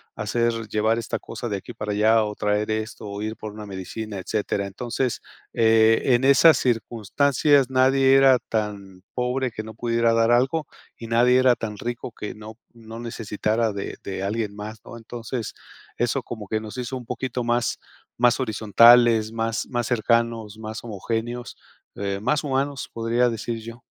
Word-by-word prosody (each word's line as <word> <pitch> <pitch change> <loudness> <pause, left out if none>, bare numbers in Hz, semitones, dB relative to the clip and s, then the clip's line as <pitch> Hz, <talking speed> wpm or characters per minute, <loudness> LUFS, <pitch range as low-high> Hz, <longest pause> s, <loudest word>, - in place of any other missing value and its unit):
hacer 115 +1 -1
llevar 110 +1 +1
esta 115 - -3
cosa 120 - -6
de 100 - -1
aquí - - -10
para 105 0 -4
allá, 110 +2 +4
o 105 0 -5
traer 105 +1 0
esto, 110 +1 -4
o 100 0 -6
ir 110 +1 -3
por 110 -1 -7
una 105 0 -8
medicina", 100 +2 -6
etcétera. 100 +1 -2
Entonces, 120 +5 -3 0.3
eh, 115 0 +4
en 120 - 0
esas 140 +2 +6
circunstancias 125 +4 +2
nadie 135 +1 +4
era 135 -2 +6
tan 100 -5 -4
pobre 125 +1 -1
que 110 - -5
no 110 0 -10
pudiera 115 0 +1
dar 115 0 +3
algo, 135 +6 +2 0.3
y 115 - -8
nadie 125 +2 +5
era 130 -1 +5
tan 110 -3 -5
rico 120 +2 -5
que 105 - -5
no 110 +1 -11 0.2
no 115 -1 -10
necesitara 110 -1 -1
de 100 - -5
de 95 -1 -5
alguien 105 0 -2
más, 105 +1 -7
¿no? 115 - -9
Entonces, 115 0 -6 0.4
eso 120 +2 0
como 110 -4 -7
que 110 +2 -1
nos 110 +2 -8
hizo 125 +1 -4
un 125 - -10
poquito 125 +1 -3
más 120 0 0 0.4
más 120 +1 +3
horizontales, 115 0 +5
más 115 -1 -2
más 120 -2 -2
cercanos, 115 -2 0
más 110 0 -7
homogéneos, 115 +2 -4 0.4
eh, 100 -1 -3
más 140 +7 +1
humanos, 140 0 -2
podría 115 +2 +1
decir 115 0 -4
yo. 115 +2 -10
115 Hz, 170 wpm, -24 LUFS, 110-120 Hz, 0.4 s, esas